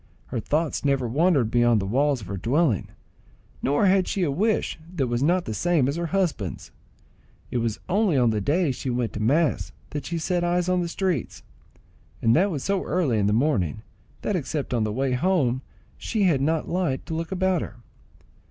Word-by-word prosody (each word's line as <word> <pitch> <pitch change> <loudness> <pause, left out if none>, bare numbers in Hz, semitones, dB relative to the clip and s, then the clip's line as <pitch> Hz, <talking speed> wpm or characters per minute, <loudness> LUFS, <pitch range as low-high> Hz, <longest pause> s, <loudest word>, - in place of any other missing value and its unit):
Her 120 - -2
thoughts 155 +6 -1
never 135 -3 +1
wandered 140 -3 +2
beyond 120 -2 +4
the 95 - -2
walls 135 +5 +1
of - - -8
her 100 - -4
dwelling, 120 - +1 0.7
nor 145 +8 +2
had 190 -1 +3
she 195 - -1
a 150 - +1
wish 205 +4 0 0.2
that 140 -6 +1
was 120 0 -1
not 175 +5 +2
the 110 - -3
same 165 0 +2
as 140 - -1
her 170 0 -2
husband's. 165 - -2 0.8
It 125 - 0
was 115 -2 -2
only 190 -4 +2
on 120 -3 +4
the 105 -1 -1
days 145 - +1
she 130 - -4
went 120 -2 -1
to - - -4
mass 145 +9 +1 0.2
that 145 -1 -4
she 170 - -2
set 175 +2 0
eyes 175 0 +1
on 180 0 +2
the 175 - -1
streets, 175 - -2 0.8
and 115 0 +3
that 190 +5 +3
was 150 -8 -3
so 195 -1 0
early 145 -12 +1
in 100 - +2
the - - +2
morning, 110 - +1 0.4
that 210 - 0
except 145 -4 -3
on 115 -3 +1
the 105 - -2
way 130 +4 -1
home 130 -3 +1 0.4
she 220 -3 -1
had 160 -8 +3
not 160 +2 0
light 170 -7 -1
to - - -5
look 165 +2 -3
about 190 -2 +1
her. 110 - -6
145 Hz, 200 wpm, -25 LUFS, 120-175 Hz, 0.8 s, beyond